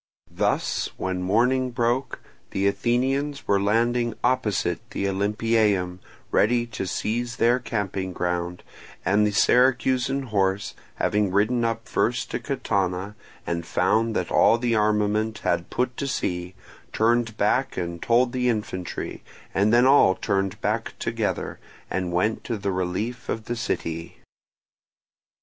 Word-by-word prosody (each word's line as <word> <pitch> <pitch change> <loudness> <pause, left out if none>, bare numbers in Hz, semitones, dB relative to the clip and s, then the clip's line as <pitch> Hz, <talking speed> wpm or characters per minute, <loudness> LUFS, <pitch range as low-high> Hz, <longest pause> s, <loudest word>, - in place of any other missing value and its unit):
Thus, - - 0
when 95 -1 -2
morning 125 +7 +2
broke 120 +1 -1 0.3
the 95 - -1
Athenians 135 +7 0
were 100 -1 +3
landing 115 +3 +1
opposite 105 -9 +1
the - - -3
Olympieum 100 -2 +1 0.3
ready 120 +2 +3
to 115 -5 -5
seize 115 +5 -2
their 120 +3 +3
camping 100 -5 -3
ground, 90 0 -2 0.4
and 105 +2 +3
the - - 0
Syracusan 130 +4 +3
horse 95 -2 0 0.2
having 105 -1 +1
ridden 110 +5 +2
up 115 0 -2
first 120 0 0
to - - -2
Catana 100 -7 -1 0.3
and 85 0 -2
found 110 +6 +1
that - - -1
all 115 - +5
the 120 0 0
armament 105 0 +1
had 85 0 0
put 125 0 -1
to 140 - -2
sea, 90 -7 -3 0.4
turned 115 0 +1
back 130 +6 +1
and 85 -1 -4
told 120 +1 +3
the 125 -1 +1
infantry, 105 -6 -3 0.3
and 100 +3 +3
then 120 +2 +5
all 130 -8 +6
turned 100 -1 -1
back - - -1
together, - - -2 0.3
and 90 -2 -1
went 105 +6 0
to 115 - -2
the 100 -1 -2
relief 95 +7 -3
of 110 -1 -3
the 120 - -3
city. 85 -7 -3
110 Hz, 135 wpm, -24 LUFS, 95-120 Hz, 0.4 s, all